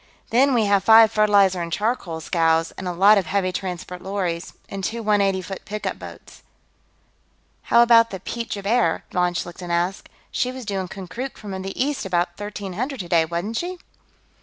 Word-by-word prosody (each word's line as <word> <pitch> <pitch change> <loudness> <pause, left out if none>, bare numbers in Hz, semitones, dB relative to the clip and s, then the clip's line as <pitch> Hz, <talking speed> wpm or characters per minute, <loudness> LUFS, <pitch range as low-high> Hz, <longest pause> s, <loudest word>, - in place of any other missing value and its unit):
Then, 260 +3 +4
we 225 -3 +3
have 200 -1 +2
five 225 -1 +7
fertilizer 200 -4 +3
and 170 0 -5
charcoal 195 -5 -2
scows, 165 0 +1
and 190 - -7
a - - -1
lot 200 +4 +5
of 185 - -5
heavy 185 0 0
transport 180 -1 -5
lorries, 185 -3 -3
and 195 -1 -6
two 230 +3 -3
one 210 -1 +3
eighty 195 -1 +1
foot 195 +1 -7
pickup 210 0 -4
boats." - - -12 1.3
"How 235 - +7
about 230 -1 +6
the 190 - -6
Piet 230 +4 -5
Joubert?" 200 -3 0
von 180 -1 +1
Schlichten 175 0 -5
asked. 175 +3 -1 0.2
"She 250 - -1
was 255 -2 -8
due 200 -2 -2
in 185 - -4
Konkrook 195 +8 -7
from 210 -2 -8
the 195 +1 -6
east 280 -1 0
about 175 -1 +1
1300 205 +7 -5
today, 170 -3 +2
wasn't 175 +7 -3
she?" 360 +1 -3
195 Hz, 180 wpm, -22 LUFS, 180-225 Hz, 1.3 s, five